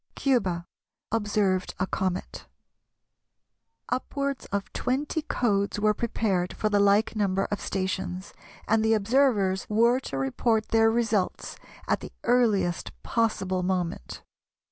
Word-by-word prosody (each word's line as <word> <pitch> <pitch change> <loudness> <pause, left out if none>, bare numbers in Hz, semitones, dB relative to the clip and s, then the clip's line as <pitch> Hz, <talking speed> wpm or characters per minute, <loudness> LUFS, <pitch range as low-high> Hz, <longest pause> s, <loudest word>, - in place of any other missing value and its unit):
Cuba, 190 -11 +1 0.5
Observed 205 -4 0
a 185 - +2
comet. 185 -1 -3 1.4
Upwards 275 +1 -2
of 200 0 -4
twenty 285 +5 -1
codes 205 -9 0
were 210 0 +3
prepared 205 -5 -1
for 215 - -1
the 205 -1 +2
like 200 +3 +3
number 195 -2 +1
of 205 - -2
stations, 190 -1 -3 0.3
and 220 +1 +3
the 220 0 +4
observers 210 -4 +2
were 235 +4 +4
to 140 - -6
report 215 - 0
their 225 -1 +4
results 225 -4 0 0.3
at - - +1
the - - -9
earliest 220 -8 +2
possible 195 -5 0
moment. 180 - -3
205 Hz, 120 wpm, -27 LUFS, 190-230 Hz, 1.4 s, the